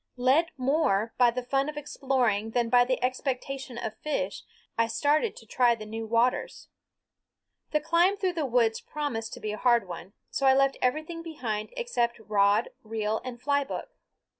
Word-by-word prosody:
Led 270 Hz, +7 st, +3 dB
more 255 Hz, -6 st, +1 dB
by 245 Hz, -1 st, +7 dB
the 245 Hz, +1 st, -3 dB
fun 270 Hz, +3 st, 0 dB
of 300 Hz, -, -7 dB
exploring 255 Hz, -7 st, 0 dB
than 235 Hz, 0 st, 0 dB
by 245 Hz, 0 st, +6 dB
the 255 Hz, 0 st, 0 dB
expectation 260 Hz, 0 st, -2 dB
of 220 Hz, -2 st, -5 dB
fish, 200 Hz, -11 st, -2 dB, 0.3 s
I 230 Hz, 0 st, +2 dB
started 295 Hz, -, +1 dB
to -, -, -13 dB
try 245 Hz, -2 st, +3 dB
the 215 Hz, -1 st, -9 dB
new 225 Hz, +1 st, -5 dB
waters. 235 Hz, +3 st, 0 dB, 1.0 s
The 300 Hz, -, +1 dB
climb 350 Hz, +4 st, +3 dB
through 375 Hz, -3 st, 0 dB
the 315 Hz, -5 st, -1 dB
woods 230 Hz, -3 st, +2 dB
promised 240 Hz, -7 st, -4 dB
to -, -, -7 dB
be 215 Hz, -, -3 dB
a 210 Hz, -, -4 dB
hard 235 Hz, -5 st, +3 dB
one, 175 Hz, +2 st, -8 dB, 0.2 s
so 275 Hz, -, +1 dB
I 265 Hz, -, +6 dB
left 275 Hz, 0 st, +3 dB
everything 310 Hz, +6 st, -1 dB
behind 235 Hz, -10 st, -4 dB
except 240 Hz, -, 0 dB
rod, 205 Hz, -, +2 dB
reel, 220 Hz, 0 st, -2 dB
and 250 Hz, -1 st, -7 dB
fly 285 Hz, +3 st, +1 dB
book. -, -, -6 dB
250 Hz, 175 wpm, -28 LUFS, 225-285 Hz, 1.0 s, by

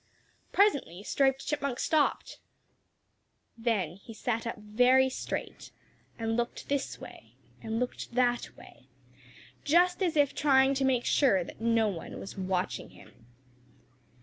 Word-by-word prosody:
Presently 280 Hz, -, +2 dB
Striped 270 Hz, +3 st, +1 dB
Chipmunk 280 Hz, -4 st, -2 dB
stopped. 310 Hz, -2 st, 0 dB, 1.2 s
Then 215 Hz, -8 st, -1 dB
he 220 Hz, +3 st, -12 dB
sat 230 Hz, 0 st, -2 dB
up 230 Hz, -, -4 dB
very 250 Hz, +5 st, +3 dB
straight 260 Hz, -, -5 dB, 0.5 s
and 225 Hz, -1 st, -1 dB
looked 240 Hz, 0 st, -3 dB
this 280 Hz, -1 st, -2 dB
way -, -, -13 dB, 0.3 s
and 225 Hz, 0 st, -3 dB
looked 245 Hz, -1 st, -4 dB
that 245 Hz, -1 st, 0 dB
way, -, -, -16 dB, 0.8 s
just 355 Hz, +5 st, +3 dB
as 345 Hz, -4 st, +1 dB
if 285 Hz, -2 st, +3 dB
trying 270 Hz, -2 st, +4 dB
to 270 Hz, 0 st, 0 dB
make 255 Hz, -2 st, +1 dB
sure 200 Hz, -11 st, +3 dB
that -, -, -12 dB
no 230 Hz, -1 st, +2 dB
one 180 Hz, -5 st, -6 dB
was 195 Hz, -, -8 dB
watching 185 Hz, -2 st, -2 dB
him. 115 Hz, -, -18 dB
245 Hz, 130 wpm, -29 LUFS, 220-275 Hz, 1.2 s, trying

